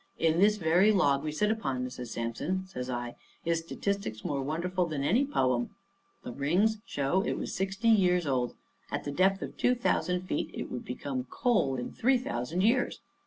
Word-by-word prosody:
In 165 0 +2
this 210 +2 +5
very 180 +4 +4
log 145 -9 +3
we 155 - -2
sit 210 +8 +1
upon, 135 - -2
Mrs. 125 -1 -6
Sampson," 115 +12 -3
says 130 -9 -6
I, 120 -1 -3 0.3
"is 165 0 +2
statistics 165 - -3
more 140 -2 -1
wonderful 175 +5 -1
than 150 -4 -3
any 230 - +3
poem. 130 - 0 0.5
The - - -6
rings 180 - +1
show 145 +4 +1
it 215 - -1
was - - -4
sixty 195 +4 0
years 180 -5 +4
old. 125 -3 0 0.3
At - - -3
the 145 - -3
depth 190 +5 +2
of - - -7
two 250 - +3
thousand 180 -6 0
feet 185 - -2
it - - -5
would 125 - -5
become 130 +1 -4
coal 205 - +1
in 125 - -4
three 260 +3 +3
thousand 160 - -2
years. 235 +5 +2
165 Hz, 185 wpm, -30 LUFS, 130-195 Hz, 0.5 s, this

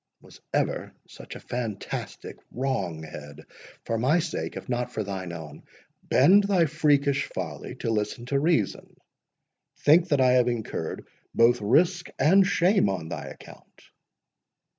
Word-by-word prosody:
"Was - - -17
ever - - -2
such - - -11
a - - -8
fantastic 115 -5 -6
wrong 100 -12 -3
head!—For 75 +9 -8
my 135 +8 +3
sake, 170 -1 -3
if - - -8
not 125 -1 -2
for 110 - -3
thine 95 -3 -5
own, 80 -3 -9 0.4
bend 190 +10 +5
thy 190 -4 +3
freakish 145 -2 +1
folly - - -6
to 115 - -3
listen 105 +2 -2
to 140 +2 0
reason. 150 - -1 0.8
Think 170 +4 +5
that 145 - +2
I 130 -1 +5
have 125 -1 +4
incurred 110 -9 -4 0.3
both 120 +1 +4
risk 170 - +2
and 185 +7 +5
shame 185 - +3
on 85 -5 -4
thy - - -5
account." - - -14
125 Hz, 140 wpm, -26 LUFS, 105-155 Hz, 0.8 s, bend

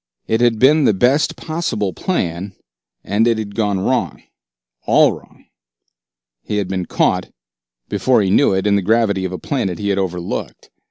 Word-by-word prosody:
It 110 +1 +1
had 120 -2 +3
been 145 +5 +4
the 105 - +3
best 130 +9 +2
possible 155 - -3
plan, 95 - -3 0.5
and 105 +4 +1
it 115 -1 +2
had 105 -2 -5
gone 105 -3 0
wrong, 95 - -1 0.6
all - - +5
wrong. - - -13 1.0
He 105 - -4
had 100 -2 -1
been 95 -2 -3
caught, - - 0 0.6
before 125 -5 +2
he 95 - 0
knew - - +4
it, 95 0 0
in 105 -1 +3
the 100 - +2
gravity 100 -1 +1
of 95 - -3
a 90 - -4
planet 100 -10 -3
he 100 -1 -3
had 100 0 +1
overlooked. 90 -2 -5
105 Hz, 170 wpm, -18 LUFS, 95-115 Hz, 1.0 s, all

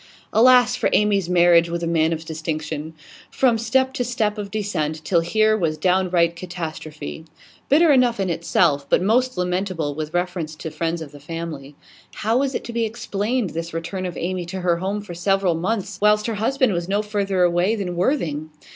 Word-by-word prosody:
Alas 245 +1 +6
for - - 0
Amy's 200 -4 +2
marriage 170 -1 +5
with 170 0 -3
a - - 0
man 165 -1 +2
of 160 0 -3
distinction! 155 -1 -4 0.3
From 240 -4 +2
step 260 +4 +1
to 250 - -1
step 225 -4 -1
of 200 -1 -5
descent, 160 -7 -3
till 175 - +3
here 215 +6 +2
was 165 -7 -1
downright 180 -2 +2
catastrophe. 160 -3 -7 0.4
Bitter 310 +3 +5
enough 250 -5 +3
in 195 - 0
itself, 145 -4 +1
but - - +4
most 250 +3 +2
lamentable 180 -4 -1
with 155 +1 -5
reference 175 -3 -2
to 160 +1 -7
the - - -18
friends 165 +1 -2
of 145 - -11
the 145 - -12
family. 150 -2 -7 0.4
How 225 +3 0
was 275 -1 -1
it - - -2
to 235 - -7
be 235 0 0
explained, 220 -1 -2
this 165 0 -5
return 185 +3 -3
of 175 - -7
Amy 180 0 -3
to 185 +1 -5
her 175 -1 +2
home 195 +4 -2
for 205 -4 -9
several 190 +1 +1
months, 190 +3 -2
whilst 210 0 +4
her 230 - -1
husband 245 +2 +1
was 175 +1 -3
no 205 +2 +1
further 200 -3 0
away 175 +5 +2
than 185 -5 -4
Worthing? 170 - -1
180 Hz, 190 wpm, -22 LUFS, 165-215 Hz, 0.4 s, Alas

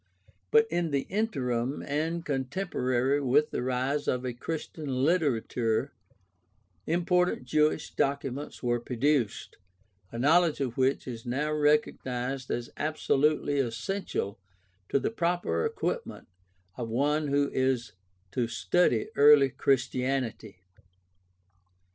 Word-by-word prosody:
But 150 +9 +5
in 170 -1 0
the 140 -2 -1
intei^im, 135 - -1
and 160 +3 -2
contemporary 135 -2 0
with 140 +3 +2
the - - -2
rise 130 +3 -1
of 125 0 0
a 125 - -2
Christian 155 +3 -5 0.2
literature, 125 -8 0 0.9
important 180 -2 +1
Jewish 150 +3 +1
documents 140 0 -2
were 120 -1 +1
produced, 125 0 -1 0.5
a 115 - -6
knowledge 160 +5 +3
of 130 -4 -2
which 130 +1 +1
is 115 -3 -6
now 145 +5 -1
recognized 135 -4 0
as 120 0 -3
absolutely 150 -1 +1
essential 120 - -3 0.5
to - - +2
the - - -1
proper 170 - 0
equipment - - -4 0.5
of 115 -2 -4
one 145 +6 +1
who 140 0 +1
is 130 -3 0 0.4
to 120 -2 0
study 115 - +1
early 145 -1 +7
Christianity. 130 -6 -1
135 Hz, 110 wpm, -28 LUFS, 125-150 Hz, 0.9 s, early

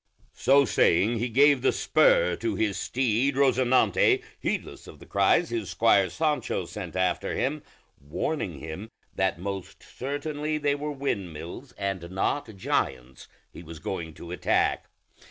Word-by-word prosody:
So 140 +3 +4
saying, 110 +1 +3
he 120 +2 -1
gave 140 +3 +5
the - - +3
spur - - +3
to 340 - -2
his 105 -3 0
steed 130 +2 0
Rosinante, 130 -2 +3 0.2
heedless - - -4
of - - -12
the - - -14
cries 100 - +2
his 110 -5 -3
squire 100 +1 +3
Sancho 155 - -1
sent - - -7
after 95 0 0
him, 145 +4 -1 0.4
warning 85 - -3
him 80 +10 -7 0.2
that 95 -3 0
most 95 +1 -6
certainly 150 +3 -3
they 145 -1 +1
were 150 +1 -3
windmills 100 - -5
and 95 -4 -4
not 100 +4 -2
giants 65 -8 -2 0.3
he - - -10
was 85 -1 -10
going 80 -1 -5
to 85 - -10
attack. 90 - 0
115 Hz, 140 wpm, -27 LUFS, 90-140 Hz, 0.4 s, gave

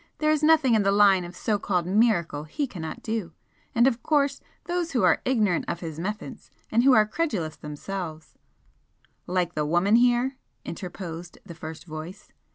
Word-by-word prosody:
There 305 0 +2
is 305 -1 +1
nothing 305 -5 +5
in 220 - +4
the 195 0 +2
line 200 -2 +5
of 175 +1 -9
so 210 +2 -1
called 180 -4 0
miracle 180 -7 +1
he 280 - -2
cannot 165 - -7
do, 220 -7 -3 0.4
and 235 +1 +5
of 245 -3 +1
course 285 -2 +1 0.2
those 345 -2 -2
who 240 - +2
are 180 -3 +4
ignorant 215 -9 +1
of 170 - -3
his 160 -2 -6
methods, 210 +5 -6 0.2
and 235 +2 +3
who 270 0 +6
are 215 -2 +6
credulous 210 - -2
themselves 155 +1 -7 0.5
" - - -40
"Like 175 -1 +1
the 150 - -1
woman 175 +8 +3
here," 245 +2 +2 0.3
interposed 175 -1 -7
the 175 - -9
first 160 0 -9
voice. 160 +3 -9
200 Hz, 175 wpm, -26 LUFS, 170-240 Hz, 0.5 s, who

